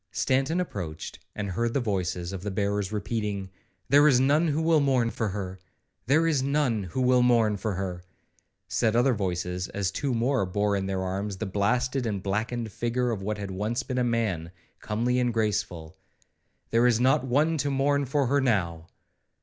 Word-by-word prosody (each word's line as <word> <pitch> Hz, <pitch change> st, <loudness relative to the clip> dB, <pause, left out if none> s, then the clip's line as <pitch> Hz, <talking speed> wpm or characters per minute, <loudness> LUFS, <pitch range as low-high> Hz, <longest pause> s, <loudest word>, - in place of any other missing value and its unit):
Stanton 135 Hz, +6 st, +1 dB
approached, 90 Hz, -, -5 dB, 0.2 s
and 100 Hz, -2 st, -3 dB
heard 115 Hz, +5 st, -1 dB
the -, -, +3 dB
voices 90 Hz, -5 st, -2 dB
of 95 Hz, -, -5 dB
the 105 Hz, -, -3 dB
bearers 100 Hz, 0 st, -1 dB
repeating, 105 Hz, -2 st, -3 dB, 0.4 s
'There 145 Hz, +3 st, +6 dB
is 130 Hz, -4 st, +5 dB
none 145 Hz, +6 st, +3 dB
who 150 Hz, 0 st, 0 dB
will 160 Hz, -1 st, +3 dB
mourn 130 Hz, -5 st, +2 dB
for 115 Hz, -, -2 dB
her!' 95 Hz, -2 st, -5 dB, 0.5 s
'There 155 Hz, +5 st, +4 dB
is 155 Hz, -5 st, +2 dB
none 135 Hz, -7 st, 0 dB
who 110 Hz, +9 st, -3 dB
will 125 Hz, 0 st, +4 dB
mourn 115 Hz, -4 st, +3 dB
for 100 Hz, 0 st, -3 dB
her!' 90 Hz, -2 st, -4 dB, 0.7 s
said 110 Hz, -1 st, +1 dB
other 125 Hz, +2 st, +4 dB
voices, 90 Hz, -3 st, -2 dB
as 100 Hz, -2 st, -2 dB
two 130 Hz, +5 st, -1 dB
more 125 Hz, +1 st, +1 dB
bore 100 Hz, +2 st, 0 dB
in 95 Hz, -1 st, -2 dB
their 95 Hz, -1 st, -2 dB
arms 95 Hz, +1 st, -3 dB
the 110 Hz, -, -3 dB
blasted 120 Hz, +6 st, 0 dB
and 100 Hz, -3 st, -3 dB
blackened 110 Hz, +3 st, -2 dB
figure 120 Hz, +3 st, -1 dB
of 105 Hz, -4 st, -3 dB
what 105 Hz, +2 st, -2 dB
had 100 Hz, -1 st, -5 dB
once 105 Hz, +6 st, -2 dB
been 125 Hz, -1 st, -2 dB
a -, -, +2 dB
man, 110 Hz, -9 st, -1 dB, 0.3 s
comely 120 Hz, +4 st, 0 dB
and 120 Hz, -2 st, 0 dB
graceful;—'there 105 Hz, +3 st, -3 dB
is 120 Hz, -2 st, +3 dB
not 130 Hz, 0 st, +3 dB
one 145 Hz, +6 st, +2 dB
to 145 Hz, -, 0 dB
mourn 140 Hz, +1 st, +1 dB
for 140 Hz, +1 st, 0 dB
her 140 Hz, +3 st, +2 dB
now!' 85 Hz, -10 st, 0 dB
115 Hz, 180 wpm, -27 LUFS, 95-130 Hz, 0.7 s, There